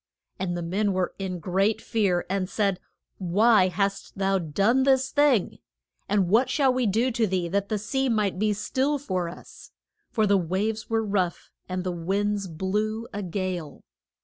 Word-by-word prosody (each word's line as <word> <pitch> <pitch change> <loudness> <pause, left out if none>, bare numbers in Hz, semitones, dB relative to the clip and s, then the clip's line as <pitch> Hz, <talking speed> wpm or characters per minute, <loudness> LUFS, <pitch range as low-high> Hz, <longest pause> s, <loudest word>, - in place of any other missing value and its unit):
And 175 -2 -2
the 175 - -3
men 195 +4 0
were 185 -1 -1
in 190 -2 -3
great 190 +5 +1
fear 195 -6 0
and 190 -1 -1
said, 200 -4 0 0.4
Why 200 +2 +4
hast 195 +3 -2
thou 195 0 +1
done 200 - +2
this 265 -1 +3
thing? 290 -9 +2 0.5
And 200 -2 +2
what 225 +8 +3
shall 270 -3 +3
we 255 -2 +1
do 230 +6 +1
to 230 -2 +1
thee 185 -2 -1
that 200 +2 -1
the 215 - 0
sea 265 +6 -1
may 210 -4 +2
be 210 +4 0
still 265 +7 0
for 185 -10 -2
us? 170 - -13 0.4
For 220 -3 +1
the 200 -1 +4
waves 200 +6 -2
were 225 -1 +1
rough, 190 -4 -1 0.2
and 185 0 -2
the 185 - -2
winds 195 +4 -1
blew 210 +7 -2
a 205 - -3
gale. 180 -5 -4
200 Hz, 175 wpm, -26 LUFS, 185-220 Hz, 0.5 s, Why